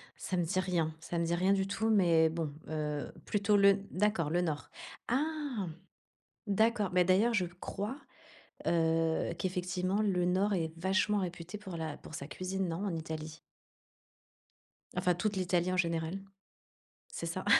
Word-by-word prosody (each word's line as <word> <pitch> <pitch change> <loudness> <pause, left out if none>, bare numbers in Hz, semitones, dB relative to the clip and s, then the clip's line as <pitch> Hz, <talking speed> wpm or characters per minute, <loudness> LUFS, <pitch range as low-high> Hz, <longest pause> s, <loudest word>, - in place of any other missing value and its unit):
Ça 185 - -3
me 175 - +2
dit 185 +3 0
rien, 170 -4 0
ça 170 +1 -4
me 170 - +1
dit 170 +1 +1
rien 185 +3 +3
du 195 0 +1
tout, 220 +3 0
mais 170 -6 +5
bon, 160 -3 -3 0.2
heu, 150 -2 -2
plutôt 205 0 +2
le 200 0 +6
d'accord, 185 -6 +1
le 175 +2 +2
nord. 155 -4 -2 0.4
Ah! 280 - -1 0.8
D'accord, 215 0 +2
bah, 180 0 +4
d'ailleurs, 195 +6 +4
je 190 -5 +2
crois, 200 +7 -5 0.7
heu, 165 -1 +2
qu'effectivement, 185 +2 0
le 180 -4 +2
Nord 190 +3 +2
est 160 -3 -1
vachement 190 +4 +2
réputé 180 +1 -4
pour 190 -4 -7
la 160 -2 -4
pour - - -11
sa 140 -2 -5
cuisine, 185 +2 -2
non, 170 +5 -2
en 190 -4 -1
Italie? 160 -1 -5 1.6
Enfin, 180 0 +3
toute 210 +2 -1
l'Italie 180 -1 +1
en - - 0
général. 165 +1 0 0.9
C'est - - -5
ça? - - -3
180 Hz, 155 wpm, -32 LUFS, 165-200 Hz, 1.6 s, le